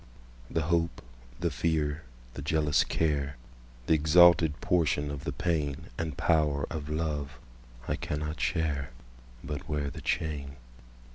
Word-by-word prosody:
The 80 - 0
hope, 85 -2 0 0.4
the - - 0
fear, 80 -2 0 0.3
the 70 - -6
jealous 75 0 +2
care, 70 -4 0 0.5
The 80 - +3
exalted 80 0 +6
portion 75 -4 +1
of 70 -2 -6
the - - -1
painAnd 75 -3 -2
power 75 -4 +2
of 75 -2 -4
love, 75 -3 -2 0.5
I - - 0
cannot 75 +1 -3
share, 75 -5 0 0.5
But 75 +2 -5
wear 75 -2 -1
the - - -8
chain. 70 -3 -2
75 Hz, 125 wpm, -29 LUFS, 70-80 Hz, 0.5 s, exalted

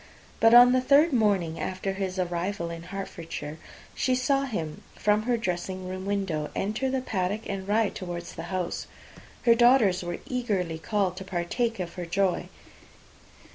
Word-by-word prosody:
But 225 +1 +6
on 245 +1 +9
the 255 0 +3
third 290 +4 +5
morning 200 -8 +2
after 190 +1 -3
his 190 -1 -3
arrival 175 0 -2
in 165 0 -6
Hertfordshire, 170 -4 -6 0.3
she 255 - +1
saw 275 +2 +1
him 165 - -4
from 210 0 +2
her 240 +2 +1
dressing 185 -2 -3
room 185 +1 -5
window 190 -7 -1
enter 220 +7 -1
the 260 0 0
paddock, 205 -1 -2
and 190 -1 -4
ride 215 0 +2
towards 175 -2 -6
the - - -6
house. 185 -2 -3 0.6
Her 235 - +6
daughters 235 -5 +5
were 175 -1 -4
eagerly 200 -10 -2
called 190 0 0
to 190 - -5
partake 190 +6 -2
of 175 -2 -4
her 175 -2 -6
joy. 185 +1 0
195 Hz, 160 wpm, -27 LUFS, 175-230 Hz, 0.6 s, on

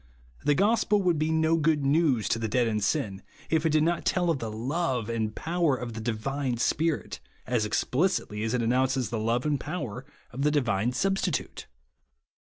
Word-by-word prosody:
The 145 - +3
gospel 210 +1 +2
would 175 -4 +2
be 155 +1 +1
no 160 +1 +2
good 150 -2 +1
news 140 -6 +2
to 115 - +1
the 115 - -1
dead 120 +3 +2
in 110 -2 0
sin, 100 -4 -1 0.3
if 160 0 +2
it - - +1
did 155 0 +3
not 170 +2 0
tell 175 -2 +1
of 150 - -1
the 115 - -4
love 125 0 -2
and 110 -2 -2
power 165 -4 +1
of 120 -2 -6
the 110 - -6
divine 120 +3 -2
Spirit, 155 +6 0 0.3
as 120 -4 0
explicitly 125 - 0
as 115 +2 -1
it 120 - 0
announces 130 0 +1
the 115 - -1
love 115 +4 0
and 145 -2 +1
power 130 - -5 0.3
of 130 +2 -5
the 150 - +3
divine 120 -6 +1
Substitute. 190 +3 -1
135 Hz, 190 wpm, -27 LUFS, 115-160 Hz, 0.3 s, The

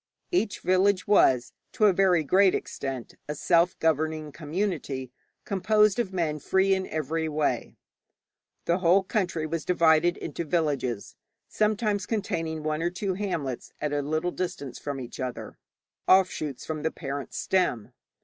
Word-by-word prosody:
Each 225 - 0
village 185 +1 +2
was 130 -12 +4 0.2
to 215 - +3
a 200 - +6
very 180 -3 +3
great 190 +5 +4
extent 135 -3 -5 0.2
a 150 - -2
self 170 +2 +2
governing 155 -1 0
community 150 -5 -3 0.3
composed 210 +1 +3
of 230 -6 -1
men 165 -5 -1
free 190 +6 +2
in 190 0 -1
every 160 +1 -2
way. 150 -1 -1 0.9
The 170 +2 +1
whole 185 +2 +4
country 180 -6 -1
was 160 +1 -3
divided 170 -1 +3
into - - -5
villages, 145 - -1 0.3
sometimes 210 -2 0
containing 165 -7 -2
one 155 0 -1
or 170 - +1
two 190 +2 -2
hamlets 165 -10 -4
at 150 -1 -2
a 145 - +1
little 155 +5 -1
distance 145 -9 -5
from 140 -2 -4
each 125 -2 -8
other 130 -2 -5 0.5
offshoots 180 -7 +2
from 155 -1 -4
the 160 - 0
parent 140 -3 -6
stem. 125 - 0
165 Hz, 145 wpm, -27 LUFS, 150-190 Hz, 0.9 s, a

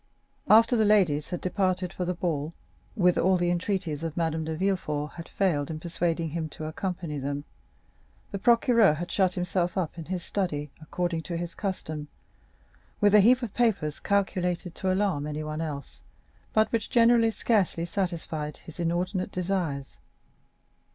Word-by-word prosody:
After 230 +3 +7
the 220 - +3
ladies 185 -9 +3
had 175 - -4
departed 185 -1 0
for 180 - -3
the 180 +1 -1
ball, 165 -3 -2 0.4
whither 180 -5 +3
all 185 +1 +4
the 175 0 +1
entreaties 175 -4 -1
of 165 -1 -4
Madame 160 -1 0
de 160 0 -3
Villefort 155 -5 -1
had 170 -1 -9
failed 160 -8 0
in 155 -1 -4
persuading 165 -1 -1
him 160 0 -3
to 155 - -7
accompany 165 -2 -4
them, 140 +1 -3 0.9
the 200 - -3
procureur 230 -5 +5
had 175 +3 -5
shut 185 -2 +2
himself 180 0 -1
up 175 -2 -2
in 160 - -6
his 180 0 -3
study, 150 -7 -2
according 170 +1 -2
to 170 +1 -4
his 170 0 -4
custom, 155 -7 -4 0.9
with 205 -1 +4
a 210 - +9
heap 245 +5 +5
of 220 -4 -4
papers 200 -11 +1
calculated 180 -3 0
to 190 +1 -1
alarm 185 -7 0
anyone 155 +1 -4
else, 145 -4 -6 0.5
but 215 0 +3
which 230 -3 -1
generally 230 -1 +5
scarcely 205 -7 +1
satisfied 165 -5 -3
his 165 - -13
inordinate 180 +3 -1
desires. 175 -7 -2
175 Hz, 160 wpm, -27 LUFS, 155-195 Hz, 0.9 s, a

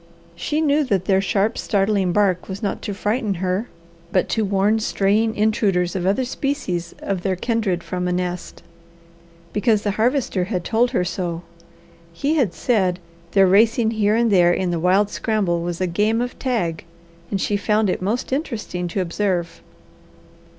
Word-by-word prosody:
She 295 - -1
knew 300 0 +3
that 195 -7 0
their 190 -1 +3
sharp, 200 +3 0
startling 195 -2 +1
bark 190 -2 +1
was 195 +3 -6
not 200 - -2
to 205 - -4
frighten 210 0 -1
her, 185 +5 -2 0.4
but 185 - +2
to 220 - +1
warn 200 +2 +2
straying 215 +1 +1
intruders 200 -4 +1
of 185 -1 -1
other 250 +7 +1
species 190 -11 -3
of 195 -2 -2
their 190 0 0
kindred 195 -4 -1
from 180 0 -3
a - - 0
nest, 180 0 -4 0.9
because 210 0 +2
the 205 - 0
Harvester 240 -7 +1
had 185 -3 -3
told 235 +6 +2
her 235 -8 0
so. 175 -2 -3 0.7
He 280 - -1
had 260 - +1
said 190 -7 +1 0.4
their 195 -1 +6
racing 220 +4 +4
here 215 -1 +2
and 230 -1 +2
there 175 -3 +5
in 175 -2 -1
wild 195 +4 +3
scramble 195 -7 0
was 175 0 -4
a 185 - +1
game 210 +6 +1
of 245 0 -4
tag 210 -11 -1 0.5
and 200 - -1
she 205 - 0
found 210 +1 +1
it 185 - -1
most 225 +7 -2
interesting 220 - -3
to 190 +3 -2
observe. 175 -1 -2
200 Hz, 165 wpm, -21 LUFS, 180-225 Hz, 0.9 s, their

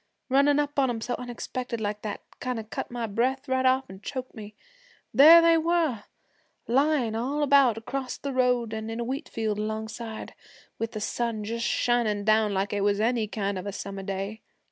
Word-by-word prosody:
Runnin' 280 +2 +4
up 290 -1 -1
on 265 -2 +3
'em 235 -2 -2
so 245 +2 -3
unexpected 245 0 -5
like 210 -1 -3
that, 210 -2 -5 0.2
kind 250 -1 -3
of 220 0 -10
cut - - -4
my 240 -1 -3
breath 250 +6 -1
right 260 0 +2
off 260 +1 +3
an' 190 +1 -12
choked 255 +3 -6
me. 210 -2 -10 0.6
There 325 +5 +9
they 335 -1 +5
were, 320 -9 0 0.6
layin' 265 -2 +2
all 275 +6 -1
about 275 -5 +5
acrost 260 +3 -5
the 280 -1 -3
road, 250 -3 +1
an' 220 0 -4
in 225 +1 -4
a - - -1
wheat 270 +6 -4
field 215 -2 -2
alongside, 220 +1 -5 0.5
with 225 +1 -3
the 215 - -4
sun 230 0 -2
just 230 +2 -2
shining 230 -4 +1
down 215 -1 +3
like 195 +1 -1
it 205 - 0
was 200 0 +2
any 225 0 +1
kind 200 -2 -2
of 185 - -7
a - - -2
summer 195 0 -6
day. 195 +3 -4
235 Hz, 195 wpm, -27 LUFS, 215-260 Hz, 0.6 s, There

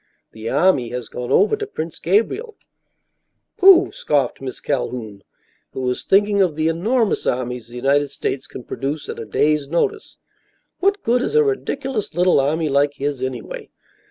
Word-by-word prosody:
The 110 +1 -6
army 140 -5 +2
has 125 -1 -5
gone 125 0 -5
over 205 - +4
to 425 -1 -5
Prince 165 - -6
Gabriel." 230 - 0 1.0
"Pooh!" 375 -1 +7
scoffed 140 -5 -1
Miss 130 -1 -6
Calhoun, 120 -7 -3 0.5
who - - -4
was 125 -1 -2
thinking 200 +1 +3
of 175 -5 +2
the 155 +1 +1
enormous 215 +7 0
armies 125 -2 -2
the 120 - -13
United 140 +3 +2
States 135 -1 -4
can 125 - -9
produce 145 +4 -4
at - - -5
a 115 - -5
day's 145 +7 +1
notice. 170 - -2 0.6
"What 395 +1 +1
good 245 +1 +2
is 360 - -2
a 455 - +6
ridiculous 270 - -2
little 180 -3 +4
army 155 +4 +1
like 140 0 +2
his, 140 -2 -3
anyway? 130 -2 -5
150 Hz, 160 wpm, -20 LUFS, 130-210 Hz, 1.0 s, Pooh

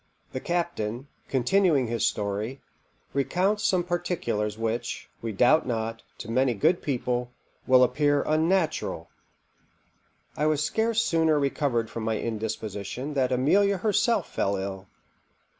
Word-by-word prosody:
_The 130 - -4
captain, 140 -8 -2 0.2
continuing 140 +2 +2
his 115 -1 -2
story, 105 +3 -1 0.5
recounts 180 - +1
some 185 -4 +2
particulars 170 - -2
which, 115 +1 -3
we 115 - -3
doubt 125 +10 +4
not, 115 -1 -2 0.2
to 115 - -7
many 130 0 +2
good 165 - +2
people, 125 -3 -1 0.4
will 130 0 +6
appear 145 +3 +2
unnatural._ 160 +2 0 1.3
I 150 - +1
was 155 -1 +1
scarce 225 +3 +1
sooner 160 -2 +2
recovered 135 -5 0
from 115 - -5
my 110 0 -1
indisposition 110 +4 -4
than 130 -3 +1
Amelia 195 +11 +3
herself 215 +4 +1
fell 100 - -1
ill. 95 0 -5
130 Hz, 125 wpm, -26 LUFS, 115-165 Hz, 1.3 s, will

